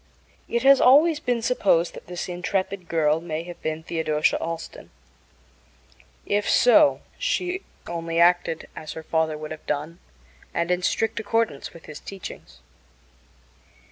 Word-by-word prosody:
It 235 +1 -1
has 275 0 +7
always 300 +5 +6
been 245 -2 -1
supposed 195 -8 +2
that - - -11
this 180 0 -5
intrepid 180 +1 -3
girl 160 -1 +2
may 165 -1 -4
have 175 0 -10
been 155 0 -3
Theodosia 160 -2 +1
Allston. 165 0 -6 1.4
If 205 0 0
so, 285 +4 +5 0.2
she 365 +1 -1 0.2
only 165 -1 -3
acted 175 -2 +3
as 155 - -7
her 160 - -8
father 160 -1 0
would 155 0 -7
have 155 - -9
done 150 +3 -3 0.6
and 170 +1 0
in 180 0 +1
strict 225 +5 0
accordance 225 -8 -1
with 165 - -14
his 155 - -9
teachings. 70 - -10
170 Hz, 140 wpm, -24 LUFS, 160-225 Hz, 1.4 s, has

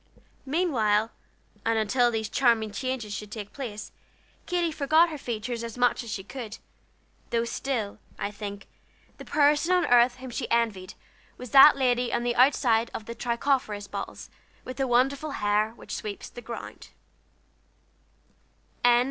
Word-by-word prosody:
Meantime, 230 - +1 0.5
and 225 0 +1
until 240 +3 +2
these 220 -2 -2
charming 225 -2 +2
changes 230 -1 -3
should 210 +1 -6
take 210 -2 -7
place, 230 -7 -6 0.6
Katy 345 -2 0
forgot 310 +3 +3
her 310 - -6
features 235 -1 -4
as 230 0 -7
much 245 0 +2
as 235 - -9
she 200 -2 -4
could, 225 0 -7 0.7
though 230 0 0
still, 235 -4 -3 0.2
I 200 - -3
think, 200 -1 -7 0.5
the - - -9
person 295 +3 +3
on 360 -1 +3
earth 245 0 +5
whom 260 0 -9
she 240 +1 -3
most - - -11
envied 215 -6 0 0.4
was 250 -2 -9
that 275 +1 +9
lady 250 -2 +1
on 240 - 0
the 240 0 0
outside 240 -3 +3
of 220 - -6
the 235 - -6
Tricopherous 235 -3 -1
bottles - - -7 0.3
with 255 - -7
the 270 -1 0
wonderful 270 +4 +1
hair 210 +1 +1
which - - -7
sweeps 210 -2 -6
the 240 - -10
ground. 235 0 -8
240 Hz, 150 wpm, -27 LUFS, 215-270 Hz, 0.7 s, that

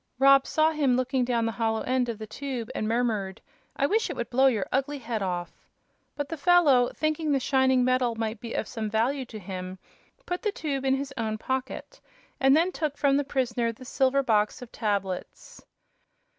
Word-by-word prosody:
Rob 275 +1 +6
saw 315 0 +3
him 280 -5 +2
looking 255 0 0
down 240 -2 0
the 225 - 0
hollow 225 +1 -1
end 255 -1 0
of 230 - -3
the 220 - -7
tube 245 +1 -5
and 215 - -2
murmured: 220 -5 -1 0.4
"I 275 - +1
wish 435 +9 +1
it - - -4
would 235 - -4
blow 265 +2 +4
your 220 -7 +1
ugly 275 +2 0
head 230 -4 -4
off!" 175 -3 -5 0.5
But 290 -1 -3
the 325 - -5
fellow, 290 -7 +4
thinking 310 0 -1
the 275 - +3
shining 260 -1 +3
metal 255 -2 +1
might 225 -1 -3
be 230 0 -6
of - - -2
some 220 -3 -4
value 250 +6 0
to 220 - -9
him, 185 -1 -6 0.5
put 355 0 -3
the 420 - 0
tube 275 -7 -3
in 265 0 +3
his 270 0 -4
own 220 -2 -2
pocket 260 +3 -4 0.4
and 270 +2 +5
then 345 +3 +2
took 300 -5 -3
from 280 -2 +3
the 285 - +2
prisoner 245 -4 -1
the 240 +3 -13
silver 270 +2 +2
box 215 -3 +1
of 240 - -12
tablets. 195 -4 -4
255 Hz, 200 wpm, -27 LUFS, 225-275 Hz, 0.5 s, Rob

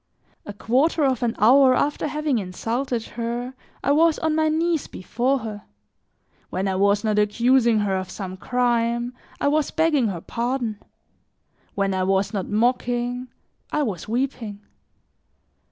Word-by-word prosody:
A 205 - -5
quarter 270 +10 +1
of 265 -2 +1
an 235 -1 0
hour 255 +4 +6
after 295 +3 0
having 300 -4 0
insulted 230 +6 -3
her, 240 +2 -4 0.3
I 280 - +2
was 320 +2 +4
on 320 -1 0
my 315 0 +2
knees 325 0 0
before 245 +8 -1
her; 215 -4 -7 0.8
when 190 +2 -2
I 190 - 0
was 200 +2 +2
not 215 -1 +1
accusing 235 +2 +3
her 200 -2 0
of 185 -1 -3
some 185 -2 -6
crime, 240 +2 0 0.3
I - - +1
was 300 +1 +2
begging 310 -7 +2
her 185 -5 -3
pardon; 235 -2 -2 1.0
when 195 -1 0
I 190 - 0
was 195 +3 +1
not 195 -3 -2
mocking, 245 +2 0 0.4
I 300 - +1
was 195 - -4
weeping. 230 -3 -3
240 Hz, 145 wpm, -23 LUFS, 210-270 Hz, 1.0 s, hour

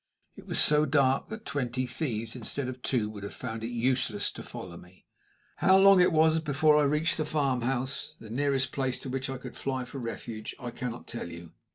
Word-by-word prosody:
It - - -13
was - - -1
so 150 0 +5
dark 135 -2 +2
that 220 0 -7
twenty 130 -3 -2
thieves 115 -5 -3
instead 125 +3 -2
of 130 -1 -6
two 120 -5 0
would 105 -2 -9
have 100 - -7
found 115 -3 -5
it - - -2
useless 120 -3 +1
to - - -9
follow 90 -2 -8
me. 90 +2 -16 0.5
How 190 - +5
long 195 -1 +7
it 180 - +5
was 160 0 +4
before 150 0 +3
I - - +3
reached 150 +3 +1
the 155 - 0
farmhouse 135 -3 -1
the 110 -1 -11
nearest 135 +1 +1
place 130 -2 -1
to 135 - -6
which 135 +1 -2
I 135 - -3
could 125 0 -9
fly 130 -2 -3
for 135 +2 -8
refuge 115 -2 -6
I 120 -1 -5
cannot 120 -1 -5
tell 120 -7 -6
you. 85 -1 -10
130 Hz, 210 wpm, -29 LUFS, 115-145 Hz, 0.5 s, long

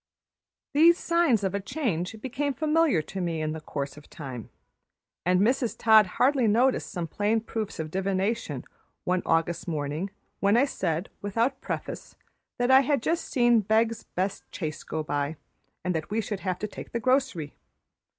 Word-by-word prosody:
These 335 +4 +6
signs 335 - +2
of 190 - 0
a 200 - 0
change 205 - -2
became 275 +2 -2
familiar 310 - +2
to 190 +4 -5
me 170 -2 -1
in 155 0 -1
the 160 0 -5
course 140 -1 -5
of 150 - -14
time, 130 -7 -7 0.8
and 180 0 +4
Mrs. 240 +2 +1
Todd 220 -2 +6
hardly 260 -2 +4
noticed 245 +5 +2
some 175 -5 -3
plain 205 +7 +1
proofs 220 -2 -4
of 155 -1 -4
divination 190 - -1 0.4
one 180 0 +1
August 165 +1 +1
morning 155 +3 -2 0.3
when 200 +3 +4
I 265 - +5
said, 175 - -2
without 230 +6 0
preface, - - -5 0.4
that 245 +1 +2
I 265 - +9
had 275 -2 +1
just 330 +1 0
seen 240 -2 +4
the 210 - -4
Beggs' 225 +1 +2
best 190 +2 -1
chaise 155 -4 -4
go 155 0 -4
by, 145 +1 -2 0.5
and 180 - 0
that 160 -1 -3
we 215 +2 0
should 210 -2 -3
have 185 -2 -2
to 210 - -3
take - - -10
the 235 - 0
grocery. 255 - +1
205 Hz, 170 wpm, -27 LUFS, 165-245 Hz, 0.8 s, I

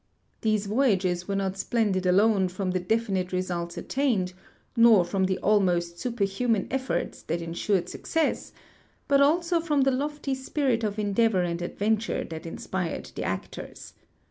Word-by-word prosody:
These 215 -2 +1
voj^ages 195 -6 +1
were 200 - -1
not 195 -1 -1
splended 195 -3 0
alone 195 +1 +4
from 185 +1 -3
the 185 - 0
defi 220 +4 0
nite 185 -1 -1
results 175 -2 -3
attained, 230 -10 0 0.4
nor 230 -6 +6
from 190 +2 0
the 190 0 0
almost 175 -5 +2
sui)erhuman 225 -1 0
efforts 265 0 -2
that 170 - -3
ensured 170 +2 -1
success, 320 - -1 0.6
but 280 0 +4
also 335 +4 +3
from 300 -4 +1
the 270 0 +3
lofty 285 +1 -2
spirit 265 -3 -1
of 210 -1 -1
endeavor 210 -2 +2
and 170 0 -2
adventure 215 +5 -1
that 160 +1 -6
inspired 180 +1 -4
the - - -4
actors. - - -6
200 Hz, 145 wpm, -27 LUFS, 185-240 Hz, 0.6 s, nor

